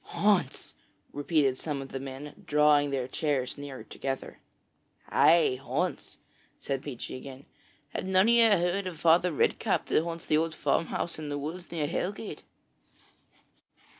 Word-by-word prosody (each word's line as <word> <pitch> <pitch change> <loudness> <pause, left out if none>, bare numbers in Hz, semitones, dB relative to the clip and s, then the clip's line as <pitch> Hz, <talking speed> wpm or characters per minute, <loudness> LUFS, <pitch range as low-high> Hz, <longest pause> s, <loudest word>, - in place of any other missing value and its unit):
'Haunts!' 195 -10 0 0.4
repeated 145 -3 +1
some 150 -3 -3
of 135 0 -7
the 135 - -5
men, 135 +7 -8
drawing 150 -1 +4
their 135 -3 -2
chairs 135 -2 -1
nearer 140 -2 -8
together. 135 -1 -5 0.7
'Ay, 160 -6 +4
haunts,' 155 +7 -3 0.4
said 135 -1 -3
Peechy 130 -4 -6
again. 135 +1 -10 0.4
'Have - - -4
none 190 +2 +4
of 235 - +5
you 230 -1 +6
heard 185 0 +1
of 170 -4 -7
Father 170 +2 +4
Redcap 150 - +1
that - - +4
haunts 165 0 -5
the 155 - +2
old 160 0 0
farmhouse 165 0 -1
in 150 -1 -5
the 145 - -2
woods 165 +5 -6
near 160 -3 -1
Hellgate?' 195 +6 -4
150 Hz, 145 wpm, -29 LUFS, 140-175 Hz, 0.7 s, you